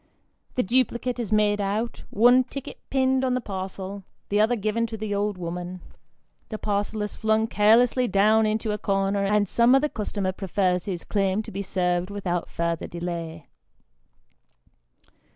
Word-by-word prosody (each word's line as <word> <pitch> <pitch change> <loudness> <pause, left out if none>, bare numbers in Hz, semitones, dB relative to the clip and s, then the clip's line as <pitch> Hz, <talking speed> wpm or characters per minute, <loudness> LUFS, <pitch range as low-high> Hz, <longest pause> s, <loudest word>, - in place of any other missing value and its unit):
The 250 - +2
duplicate 245 +2 0
is 225 -4 -3
made 210 -1 +3
out, 210 +4 -2
one 245 +4 +5
ticket 275 +1 -8
pinned 265 -1 +2
on 255 -1 +1
the - - +1
parcel, 195 -2 -6 0.3
the 205 +1 +3
other 225 +3 +3
given 220 +2 -1
to 225 0 -6
the 215 -1 -3
old 205 -1 -1
woman; 180 +1 -5 0.7
the 215 - -4
parcel 210 +1 -2
is 210 - -5
flung 220 0 +1
carelessly 230 +4 +4
down 215 +2 +4
into 215 0 -1
a 210 - -3
corner, 195 0 0
and 205 +1 +2
some 235 +6 +4
other 295 +3 +2
customer 205 -5 -2
prefers 185 -2 -1
his 180 -4 -4
claim 200 0 0
to - - -9
be 195 - -4
served 180 -1 -1
without 185 -4 -3
further 170 -1 -2
delay. 170 -2 -5
205 Hz, 155 wpm, -25 LUFS, 190-225 Hz, 0.7 s, one